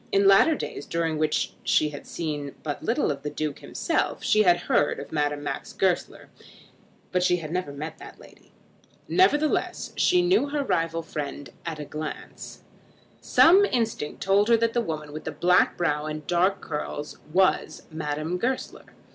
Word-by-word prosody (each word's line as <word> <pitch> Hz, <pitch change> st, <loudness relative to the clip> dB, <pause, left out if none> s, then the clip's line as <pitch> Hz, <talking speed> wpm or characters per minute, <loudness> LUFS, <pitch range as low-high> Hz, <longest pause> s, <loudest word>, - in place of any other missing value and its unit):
In 195 Hz, 0 st, +4 dB
latter 195 Hz, +11 st, +6 dB
days, 145 Hz, -, -6 dB
during 165 Hz, -2 st, -1 dB
which 155 Hz, -1 st, 0 dB
she 155 Hz, -, +2 dB
had 145 Hz, -1 st, -10 dB
seen 145 Hz, -4 st, -4 dB
but 145 Hz, -2 st, -4 dB
little 235 Hz, -, +1 dB
of 140 Hz, -1 st, -5 dB
the 150 Hz, -, -4 dB
Duke 150 Hz, -1 st, -4 dB
himself, -, -, -2 dB
she 215 Hz, -, +4 dB
had 175 Hz, -4 st, +4 dB
heard 145 Hz, -, +1 dB
of -, -, -9 dB
Madame 145 Hz, -1 st, -1 dB
Max 145 Hz, -, -5 dB
Goesler, -, -, -1 dB, 0.8 s
but 180 Hz, -, +1 dB
she 180 Hz, 0 st, +3 dB
had 160 Hz, -3 st, -7 dB
never 180 Hz, -4 st, -2 dB
met 150 Hz, +3 st, -7 dB
that -, -, -12 dB
lady. -, -, -18 dB, 0.6 s
Nevertheless, 310 Hz, -5 st, +1 dB
she 360 Hz, 0 st, +3 dB
knew 355 Hz, -5 st, +3 dB
the 290 Hz, 0 st, -1 dB
rival 165 Hz, -8 st, -1 dB
friend 145 Hz, -3 st, -6 dB, 0.2 s
at 165 Hz, -2 st, -3 dB
a 150 Hz, -, -6 dB
glance. 155 Hz, +2 st, -7 dB, 0.6 s
Some 375 Hz, +5 st, +6 dB
instinct 225 Hz, -, -1 dB
told 200 Hz, +2 st, +3 dB
her 230 Hz, -, +6 dB
that 230 Hz, 0 st, 0 dB
that 240 Hz, -, +2 dB
woman 155 Hz, -7 st, -5 dB
with 155 Hz, -, -7 dB
the 160 Hz, -, -3 dB
black 180 Hz, +4 st, +3 dB
brow 150 Hz, -3 st, 0 dB
and 155 Hz, 0 st, -5 dB
the -, -, -26 dB
dark 185 Hz, +3 st, +1 dB
curls 150 Hz, -1 st, -5 dB
was 185 Hz, +2 st, +1 dB
Madame 155 Hz, +2 st, -3 dB
Goesler. 255 Hz, +4 st, -3 dB
165 Hz, 170 wpm, -25 LUFS, 150-205 Hz, 0.8 s, latter